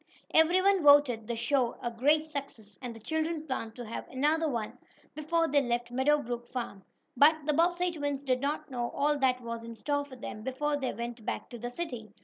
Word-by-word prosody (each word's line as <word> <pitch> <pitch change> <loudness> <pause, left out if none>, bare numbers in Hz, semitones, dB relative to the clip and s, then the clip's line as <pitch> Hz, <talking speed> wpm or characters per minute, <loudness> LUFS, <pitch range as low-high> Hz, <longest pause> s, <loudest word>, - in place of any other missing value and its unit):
Everyone 370 +4 +5
voted 285 -7 +5
the 235 - -2
show 240 +1 +1
a 240 - -3
great 295 +7 +3
success, 270 -10 -8
and 245 -2 -6
the - - -10
children 315 +5 -2
planned 230 -6 -4
to 245 - -7
have 225 - -6
another 305 +4 +1
one 230 -5 -4 0.3
before 330 +2 0
they 285 -1 +3
left 240 -1 -2
Meadow 285 +4 +2
Brook 240 0 -5
farm. 230 -7 -5 0.3
But 290 +5 +7
the 300 - +2
Bobbsey 350 +3 +2
twins 285 -3 -3
did 255 -2 0
not 285 0 -2
know 240 -2 -2
all 295 +1 +1
that 255 -2 +2
was 230 -1 -5
in 230 0 -8
store 285 +6 -1
for 285 -2 -11
them 230 -3 -7
before 270 +5 -1
they 270 -3 -2
went 235 +1 -6
back - - -4
to 240 - -7
the 240 +2 -4
city. 245 -6 -5
265 Hz, 205 wpm, -30 LUFS, 240-300 Hz, 0.3 s, But